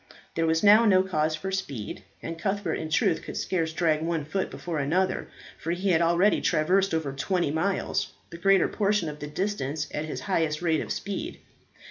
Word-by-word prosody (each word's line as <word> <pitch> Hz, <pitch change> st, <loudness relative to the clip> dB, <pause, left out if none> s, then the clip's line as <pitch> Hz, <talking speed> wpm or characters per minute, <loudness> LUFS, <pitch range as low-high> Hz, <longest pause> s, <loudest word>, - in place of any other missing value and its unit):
There 165 Hz, 0 st, 0 dB
was 160 Hz, +2 st, +1 dB
now 210 Hz, +3 st, +8 dB
no 190 Hz, -4 st, +5 dB
cause 155 Hz, -4 st, 0 dB
for 190 Hz, +5 st, -5 dB
speed, 140 Hz, -, -4 dB, 0.2 s
and 165 Hz, 0 st, -5 dB
Cuthbert 200 Hz, +2 st, -1 dB
in 160 Hz, -, -4 dB
truth 160 Hz, 0 st, +2 dB
could -, -, -7 dB
scarce 165 Hz, -4 st, -1 dB
drag 160 Hz, -2 st, +1 dB
one 165 Hz, -2 st, -1 dB
foot 190 Hz, +5 st, -2 dB
before 165 Hz, -3 st, -4 dB
another, 175 Hz, +7 st, 0 dB, 0.3 s
for 165 Hz, -, -5 dB
he 190 Hz, +3 st, -1 dB
had 165 Hz, -1 st, +3 dB
already 170 Hz, +5 st, +3 dB
traversed 185 Hz, +4 st, +2 dB
over 155 Hz, -4 st, -1 dB
twenty 170 Hz, +2 st, 0 dB
miles, 180 Hz, +6 st, -1 dB, 0.2 s
the 170 Hz, -, -7 dB
greater 195 Hz, 0 st, +4 dB
portion 205 Hz, -5 st, 0 dB
of 150 Hz, 0 st, -8 dB
the 150 Hz, -, -5 dB
distance 150 Hz, -3 st, -2 dB
at 150 Hz, -, -2 dB
his 155 Hz, -, -5 dB
highest 160 Hz, -5 st, 0 dB
rate 160 Hz, -2 st, +2 dB
of -, -, -5 dB
speed. 200 Hz, -1 st, -4 dB
165 Hz, 190 wpm, -27 LUFS, 155-190 Hz, 0.3 s, now